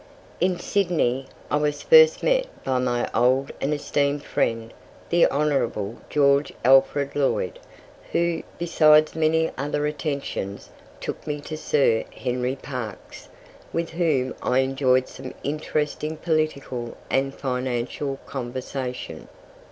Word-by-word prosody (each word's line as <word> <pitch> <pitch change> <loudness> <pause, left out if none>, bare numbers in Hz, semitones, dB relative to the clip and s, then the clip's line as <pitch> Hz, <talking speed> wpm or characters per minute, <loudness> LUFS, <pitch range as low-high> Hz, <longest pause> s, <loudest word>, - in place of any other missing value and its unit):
In 180 +1 +2
Sydney 165 -10 0 0.2
I 145 - +3
was 150 -1 -1
first 475 0 +7
met - - +2 0.2
by 130 -1 0
my 120 -1 0
old 130 +2 +2
and 140 - 0
esteemed 145 -1 0
friend 115 0 -1 0.4
the 170 0 +5
Honourable 135 -7 0
George 140 0 +3
Alfred 135 +2 +4
Lloyd, 140 -2 0 0.5
who, 170 -1 +1 0.2
besides 155 -2 +5
many 160 0 +2
other 145 +1 -1
attentions, 140 - -4 0.3
took - - -6
me 150 -1 -2
to 155 - -6
Sir 140 -7 +2
Henry 125 0 -1
Parkes, 125 -6 -7 0.4
with 165 0 -2
whom 155 -7 +1
I 125 +1 +2
enjoyed 130 -1 +2
some 130 0 -9
interesting 150 +1 -2
political 145 -7 -2
and 135 +1 +1
financial 130 +1 -2
conversation. 125 - -5
140 Hz, 115 wpm, -24 LUFS, 130-155 Hz, 0.5 s, first